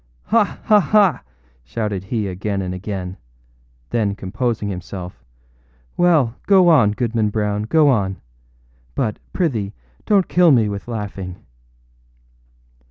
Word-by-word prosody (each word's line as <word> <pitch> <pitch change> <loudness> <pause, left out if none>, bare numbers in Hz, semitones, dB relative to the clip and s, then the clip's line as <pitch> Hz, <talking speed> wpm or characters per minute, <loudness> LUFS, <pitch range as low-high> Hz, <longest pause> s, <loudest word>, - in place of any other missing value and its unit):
âHa! 225 -2 +2
ha! 210 -1 +5
ha!â 195 -5 +3 0.4
shouted 100 - -3
he 110 -1 -2
again 95 +1 -3
and 90 0 -4
again; 95 -1 -5 0.7
then 105 -4 0
composing 105 +3 -2
himself, 90 -6 -7 0.7
âWell, 160 -10 +3
go 190 -3 +6
on, 125 -11 +5
Goodman 115 -2 0
Brown, 105 0 -1
go 155 +6 +4
on; 100 -8 +1 0.8
but, 105 - -1
prithee, 115 - -1 0.3
donât 200 -3 +3
kill 175 -1 +4
me 120 -7 +4
with 100 +2 -6
laughing. 100 -5 -6
105 Hz, 115 wpm, -20 LUFS, 100-145 Hz, 0.8 s, go